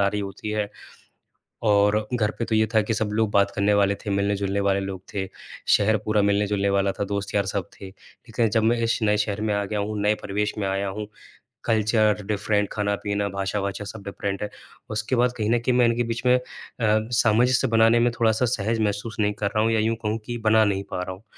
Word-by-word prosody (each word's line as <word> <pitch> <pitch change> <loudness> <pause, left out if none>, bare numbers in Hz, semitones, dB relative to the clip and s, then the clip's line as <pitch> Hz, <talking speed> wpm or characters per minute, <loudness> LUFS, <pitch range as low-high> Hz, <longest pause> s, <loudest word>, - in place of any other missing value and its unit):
आ 100 - +4
रही 105 +1 -2
होती 100 +2 -6
है। 105 -1 -1 1.0
और 105 0 +3
घर 110 -3 +1
पे 115 - 0
तो 110 - -1
ये 110 0 +3
था 110 - +6
कि 110 +2 -2
सब 110 -1 -1
लोग 110 -1 +1
बात 100 0 +3
करने 100 +1 +2
वाले 100 0 +3
थे - - -2
मिलने-जुलने 100 0 0
वाले 100 -1 +2
लोग 95 -1 -5
थे। 95 -1 -2 0.4
शहर 110 +2 +4
पूरा 105 -1 +2
मिलने-जुलने 100 0 +1
वाला 100 0 +2
था - - +1
दोस्त-यार 100 0 -1
सब 100 -2 -3
थे। 95 - -7
लेक़िन 115 +4 -4
जब 110 +1 +1
मैं 115 +2 +3
इस 115 - +1
नए 105 0 +3
शहर 105 -1 -1
में 110 -1 0
आ 100 - 0
गया 105 +1 -3
हूँ, 105 +1 -3
नए 105 +1 +2
परिवेश 105 +1 -1
में 100 -2 -1
आया 95 +1 -1
हूँ 105 +2 -5 0.6
कल्चर 110 -1 +2
डिफरेंट 105 -1 0
खाना-पीना, 100 0 -1
भाषा-वाषा 100 +1 -3
सब 100 0 -8
डिफरेंट 100 0 -4
है। 105 - -3 0.4
उसके 110 +4 -1
बाद 125 +1 +2
कहीं 105 -1 -1
न 120 - +3
कहीं 120 +1 0
मैं 125 - +5
इनके 115 +1 +1
बीच 115 +2 -4
में 125 0 +5
अ, - - -5 0.4
सामंजस्य 115 +3 +2
बनाने 115 +1 +4
में 120 +1 +3
थोड़ा-सा 115 +1 +3
सहज 115 -1 -1
महसूस 105 +2 -2
नहीं 105 -1 +2
कर - - +3
रहा 110 - +3
हूँ 115 - +2
या 110 - +2
यूँ 115 +1 +1
कहूँ 105 +1 0
कि 120 -1 -4
बना 110 0 +5
नहीं 100 -1 0
पा 90 - -2
रहा 95 - -5
हूँ। 100 - -19
105 Hz, 225 wpm, -24 LUFS, 100-110 Hz, 1.0 s, था